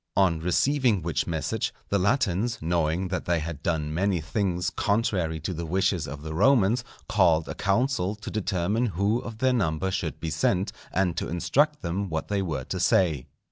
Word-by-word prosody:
On 90 Hz, -5 st, +3 dB
receiving 110 Hz, -, +2 dB
which 85 Hz, -1 st, -1 dB
message 80 Hz, -4 st, -1 dB, 0.2 s
the 100 Hz, -, +2 dB
Latins, 105 Hz, +1 st, +1 dB
knowing 85 Hz, +2 st, 0 dB
that 90 Hz, -, -3 dB
they 85 Hz, 0 st, +2 dB
had 80 Hz, -1 st, -5 dB
done 75 Hz, -3 st, -1 dB
many 95 Hz, +2 st, +1 dB
things 90 Hz, +2 st, -1 dB
contrary 95 Hz, -7 st, 0 dB
to 85 Hz, +4 st, -3 dB
the 85 Hz, 0 st, -5 dB
wishes 95 Hz, -1 st, +1 dB
of 75 Hz, +3 st, -7 dB
the 80 Hz, 0 st, -5 dB
Romans, 120 Hz, -, +3 dB, 0.2 s
called 80 Hz, -1 st, +3 dB
a -, -, -4 dB
council 100 Hz, -2 st, 0 dB
to 105 Hz, +1 st, -8 dB
determine 105 Hz, +3 st, 0 dB
who 105 Hz, +5 st, +2 dB
of 115 Hz, -2 st, -7 dB
their 130 Hz, +2 st, +2 dB
number 95 Hz, -5 st, 0 dB
should 90 Hz, -5 st, -3 dB
be 80 Hz, -, -3 dB
sent, 95 Hz, -2 st, +1 dB, 0.2 s
and 90 Hz, -3 st, +1 dB
to -, -, -2 dB
instruct 145 Hz, -, +1 dB
them 95 Hz, +3 st, -2 dB
what 80 Hz, -1 st, -3 dB
they 100 Hz, -1 st, 0 dB
were 80 Hz, -8 st, -3 dB
to -, -, -4 dB
say. 80 Hz, -9 st, +2 dB
90 Hz, 180 wpm, -26 LUFS, 80-105 Hz, 0.2 s, On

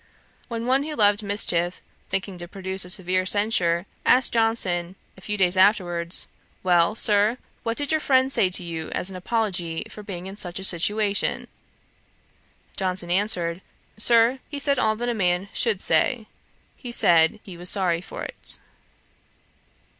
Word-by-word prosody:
When 230 Hz, -1 st, -5 dB
one 260 Hz, +2 st, +2 dB
who 300 Hz, +1 st, -5 dB
loved 205 Hz, -2 st, +3 dB
mischief, 180 Hz, -4 st, -1 dB, 0.3 s
thinking 195 Hz, -1 st, -3 dB
to 175 Hz, -, -6 dB
produce 190 Hz, 0 st, -1 dB
a 180 Hz, -, -9 dB
severe 185 Hz, 0 st, +1 dB
censure, 185 Hz, -3 st, +1 dB, 0.2 s
asked 255 Hz, 0 st, +3 dB
Johnson, 190 Hz, -6 st, 0 dB, 0.2 s
a 190 Hz, -, -16 dB
few 210 Hz, +3 st, -3 dB
days 185 Hz, -2 st, +3 dB
afterwards, 180 Hz, -3 st, +2 dB, 0.4 s
'Well, 175 Hz, +2 st, +3 dB
Sir, 210 Hz, +2 st, +3 dB, 0.2 s
what 230 Hz, 0 st, -3 dB
did 290 Hz, 0 st, -2 dB
your 315 Hz, -1 st, +1 dB
friend 260 Hz, -1 st, +2 dB
say 190 Hz, -8 st, +3 dB
to 180 Hz, 0 st, -2 dB
you, 165 Hz, -2 st, -5 dB
as 190 Hz, -, -1 dB
an -, -, -9 dB
apology 180 Hz, -4 st, -2 dB
for 210 Hz, -, -10 dB
being 185 Hz, -3 st, -7 dB
in 190 Hz, +1 st, -7 dB
such 175 Hz, -4 st, -5 dB
a 190 Hz, -, -5 dB
situation?' 200 Hz, +3 st, +1 dB, 1.3 s
Johnson 185 Hz, -2 st, -1 dB
answered, 180 Hz, -3 st, +1 dB, 0.3 s
'Sir, 230 Hz, +3 st, +4 dB
he 290 Hz, -, -6 dB
said 280 Hz, -1 st, 0 dB
all 220 Hz, -3 st, +2 dB
that 240 Hz, +2 st, -4 dB
a 240 Hz, -, 0 dB
man 180 Hz, -2 st, 0 dB
should 220 Hz, -6 st, -1 dB
say: 220 Hz, +9 st, +1 dB, 0.5 s
he 245 Hz, -, -9 dB
said 170 Hz, -3 st, +4 dB
he 185 Hz, -, -10 dB
was 175 Hz, +1 st, -1 dB
sorry 180 Hz, -4 st, +1 dB
for -, -, -8 dB
it.' -, -, +1 dB
195 Hz, 160 wpm, -24 LUFS, 175-225 Hz, 1.3 s, Sir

